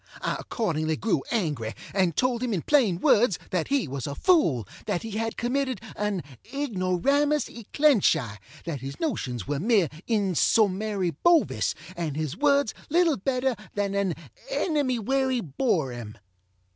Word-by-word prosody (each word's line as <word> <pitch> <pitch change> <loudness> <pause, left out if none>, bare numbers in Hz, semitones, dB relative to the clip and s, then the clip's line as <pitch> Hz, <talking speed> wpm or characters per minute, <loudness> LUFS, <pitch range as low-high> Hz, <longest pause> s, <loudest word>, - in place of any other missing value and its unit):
I - - 0
accordingly 160 -8 -1
grew 220 +8 0
angry, 150 - -1 0.2
and 185 -5 +2
told 250 -2 +1
him 250 -3 -1
in 170 - -3
plain 230 - +3
words, 210 0 +4
that 180 -3 0
he 275 - +1
was 135 0 -4
a 140 - -4
fool, 150 - +3 0.2
that 175 - -1
he 225 - -6
had 225 +2 -2
committed 260 -1 -1 0.2
an 210 -4 -2 0.3
ignoramus 280 - +1
e 235 -3 -11
clench 285 - +4
eye, 115 -9 -5 0.3
that 155 -7 -4
his 135 +1 -7
notions 125 - -2
were 145 -1 -1
mere 200 - +3 0.2
insommary 200 -1 +2
Bovis, 345 -3 +3 0.2
and 165 -4 -3
his 155 -1 -2
words 280 -1 +2 0.2
little 330 -1 +3
better 255 +4 0 0.2
than 200 -1 -1
an 200 -4 0 0.4
ennemywerryborŌĆÖem. 245 - 0
210 Hz, 140 wpm, -26 LUFS, 165-265 Hz, 0.4 s, words